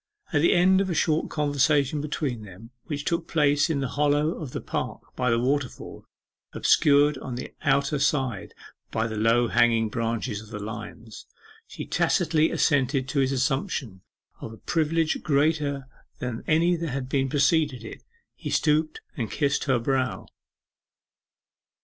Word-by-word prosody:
At 145 - +3
the 170 - +4
end 190 +2 +4
of 195 - -1
a 175 - -1
short 155 0 +1
conversation 145 -1 +1
between 145 -5 -3
them, 105 +3 -12
which 145 -2 -4
took 170 -1 -1
place 145 -2 +2
in 145 -4 0
the 135 - -1
hollow 145 +2 +2
of 155 -5 -6
the - - -5
park - - -4
by 125 0 0
the 115 - +3
waterfall, 130 +2 -2 0.5
obscured 145 -1 +4
on 125 - -6
the 125 - -7
outer 140 0 +1
side 135 -7 -1 0.3
by 110 - -1
the 110 -1 -4
low 115 +3 +3
hanging 115 -2 +3
branches 115 -1 -2
of 110 - -14
the 105 - -6
limes, 110 +1 -8 0.4
she - - -7
tacitly 160 -2 +2
assented 135 -2 +1
to 140 - 0
his 135 0 +2
assumption 135 - -2 0.4
of 110 - -7
a - - -12
privilege 160 +2 0
greater 145 -2 0 0.3
than 125 -2 -5
any 170 +3 +3
that 165 -1 -3
had 135 -1 -4 0.2
preceded 145 -3 +2
it. 110 - -9 0.3
He - - -7
stooped 155 0 +1
and 115 -5 -3
kissed 140 -2 0
her 130 -3 +2
brow. 130 +2 -1
140 Hz, 155 wpm, -25 LUFS, 120-150 Hz, 0.5 s, the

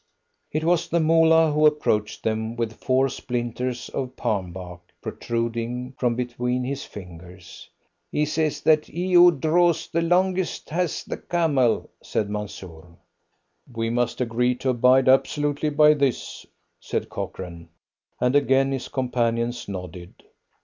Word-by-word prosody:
It 155 +1 -1
was 170 0 +1
the 170 - +2
Moolah 160 0 +4
who 150 +1 +5
approached 110 -8 0
them 110 +1 -2
with 115 -2 -2
four 130 +1 +3
splinters 125 -1 -4
of 130 -1 -4
palm 95 -8 -2
bark 90 -1 -9 0.2
protruding 115 +2 -3
from 120 -2 0
between 125 +1 -2
his 140 +2 -4
fingers. 90 -1 -12 0.4
"He 150 - +1
says 155 0 -1
that 155 -1 +3
he 180 +3 -3
who 175 0 +9
draws 165 +2 +2
the 165 - -1
longest 180 +1 0
has 175 0 -1
the - - -5
camel," 150 -9 +1
said 105 -1 -2
Mansoor. 90 -5 -8 0.7
"We 115 -1 -2
must 120 -1 -1
agree 125 +1 +1
to 130 - -2
abide 130 +1 +4
absolutely 145 +3 +2
by 150 +1 +5
this," 140 -4 -2 0.3
said - - -3
Cochrane, 85 -2 -7 0.5
and 125 +2 +1
again 135 -1 +3
his 135 -2 -3
companions 120 -2 -1
nodded. 90 -2 -8
125 Hz, 135 wpm, -24 LUFS, 115-150 Hz, 0.7 s, who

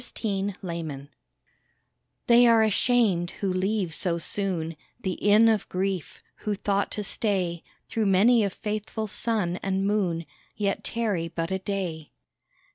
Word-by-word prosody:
TRANSIENTS 175 - -3 1.2
They 240 0 +6
are 230 -1 +6
ashamed 215 -5 +2
who 195 -2 0
leave 190 -2 0
so 170 0 0
soon 170 -2 -3 0.3
The 190 - -1
Inn 210 +4 +5
of 220 -3 +1
Grief 185 -2 -3
who 210 -1 -2
thought 200 0 0
to 210 - -3
stay 185 -5 -1 0.2
Through 220 -2 0
many 215 +5 +5
a 200 - +1
faithful 215 +2 -4
sun 205 -4 -1
and 195 0 0
moon, 185 -5 0 0.3
Yet 200 -2 -1
tarry 210 -8 -1
but 165 +1 -4
a 190 - 0
day. 185 -5 -4
195 Hz, 130 wpm, -26 LUFS, 175-215 Hz, 1.2 s, They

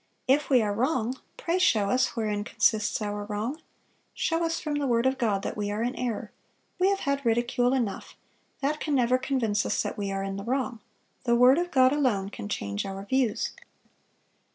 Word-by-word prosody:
"If 285 +3 +3
we 255 -5 +5
are 205 -1 0
wrong, 255 +1 0 0.2
pray 345 +2 0
show 210 - +3
us 255 0 +1
wherein 210 -3 -1
consists 215 0 +1
our 205 0 -3
wrong. 220 +9 -3 0.5
Show 330 0 0
us 330 0 0
from 295 -2 -2
the 285 - -1
word 235 0 +2
of 260 0 +1
God 205 -5 +1
that - - -3
we 205 -1 -2
are 210 +2 -1
in 245 +2 -1
error; 245 -3 -3 0.5
we 370 +2 +4
have 395 0 0
had 280 0 -1
ridicule 240 +1 +2
enough; 235 -7 -2 0.5
that 295 +2 0
can 300 -2 -1
never 250 0 +3
convince 225 -7 0
us - - 0
that - - -4
we 200 -1 -2
are 195 0 -2
in 195 0 -4
the 200 - -5
wrong; 255 0 -2 0.5
the 235 -1 +3
word 250 +5 +6
of 355 0 -1
God 260 -3 +4
alone 235 -10 +1
can 205 - -7
change 100 - -2
our 195 0 -6
views. 255 -2 0
240 Hz, 200 wpm, -27 LUFS, 205-270 Hz, 0.5 s, word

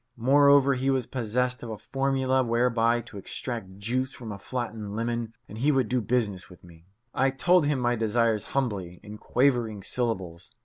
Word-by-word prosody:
Moreover, 140 +2 +5
he 130 +1 -1
was 130 -3 +1
possessed 125 +1 -1
of 120 - -7
a 110 - -5
formula 135 +1 0
whereby 120 0 +2
to 115 -3 -10
extract 100 -1 -5
juice 125 +6 -1
from 115 -5 -8
a 100 - -7
flattened 110 -3 -5
lemon, 115 0 -3
and 105 - -9
he 145 +5 +3
would 130 -6 +1
do 125 -1 +1
business 105 -5 -1
with 90 - -16
me. 85 -1 -17 0.3
I 135 +1 +2
told 165 +4 +3
him 145 -3 +1
my 120 0 +1
desires 115 -1 +1
humbly, 95 -9 -2
in 105 +1 -10
quavering 120 -6 +1
syllables. 95 -9 -3
120 Hz, 175 wpm, -27 LUFS, 105-130 Hz, 0.3 s, Moreover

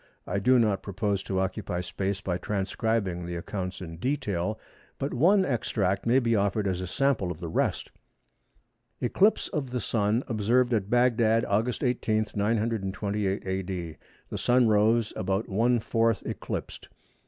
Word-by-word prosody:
I 100 - -1
do 130 +6 +4
not 105 -5 +2
propose 100 0 -1
to 95 -1 -2
occupy 90 -1 -2
space 95 +2 -3
by 90 -2 -2
transcribing 100 -2 -1
the 85 - -4
accounts 90 +2 -5
in 80 -2 -7
detail, 110 - -2 0.4
but 140 - -3
one 185 +10 +4
extract 105 -6 -1
may 120 +3 +5
be 115 -3 +2
offered 100 0 +1
as 90 -1 -1
a 90 - -4
sample 135 -6 +1
of 85 -3 -5
the 85 - -5
rest—"Eclipse 120 - -2
of 145 -6 -3
the 125 0 -2
Sun 110 +2 0
observed 120 +2 +2
at 105 -3 0
Bagdad, 115 -2 +3
August 115 +7 0
18, 110 -4 0
928 105 -2 -1
A.D. 95 -4 -4 0.3
The - - -3
Sun 125 -1 +4
rose 110 +1 +3
about 95 +3 -1
one 115 +4 +2
fourth 115 -1 +1
eclipsed. - - -5
105 Hz, 145 wpm, -27 LUFS, 95-120 Hz, 0.4 s, may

